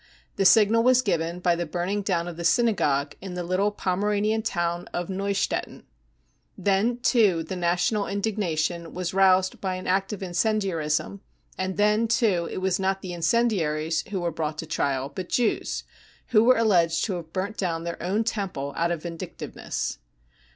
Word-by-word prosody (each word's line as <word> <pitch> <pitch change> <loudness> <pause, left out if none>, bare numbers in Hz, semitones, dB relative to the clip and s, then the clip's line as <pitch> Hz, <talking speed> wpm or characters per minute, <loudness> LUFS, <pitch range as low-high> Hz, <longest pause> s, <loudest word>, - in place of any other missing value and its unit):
The 195 - +1
signal 220 +3 +6
was 255 +1 +4
given 170 -3 -1
by 175 -1 +3
the 170 0 -3
burning 180 +5 -2
down 175 -4 -1
of 175 - -6
the 170 - -6
synagogue 155 - +2
in 185 -1 -6
the 180 - -3
little 185 +4 +1
Pomeranian 210 +2 0
town 175 -5 -2
of 175 +1 -3
Neustettin. 195 +1 -2 0.7
(Then 200 +5 +1
too 215 -9 +3
the 160 - -16
44 - - -4
national 180 +4 +1
55 195 - -4
indignation 175 -5 -1
was 180 -1 -3
roused 190 -1 +3
by 190 -2 -1
an 185 - -7
act 195 +2 +1
of 200 -2 -5
incendiarism; 175 - -1 0.3
and 185 0 -3
then 210 +2 +3
too 215 -7 +2
it - - -5
was 190 0 0
not 195 0 -1
the 180 -2 -5
incendiaries 165 -4 +1
who 195 -3 -2
were 170 -1 -1
brought 155 -1 -3
to 160 - -4
trial, 140 -3 -1
but 185 +2 -6
Jews, 240 -3 0 0.5
who 220 -3 +5
were 255 0 +6
alleged 170 -7 +3
to 205 - -2
have 160 -2 -9
burnt 195 +4 -3
down 165 -3 -2
their 170 0 -5
own 195 +6 0
temple 190 -11 -3
out 170 +1 +1
of 170 -3 -3
vindictiveness.) 170 -1 -5
185 Hz, 175 wpm, -25 LUFS, 170-205 Hz, 0.7 s, signal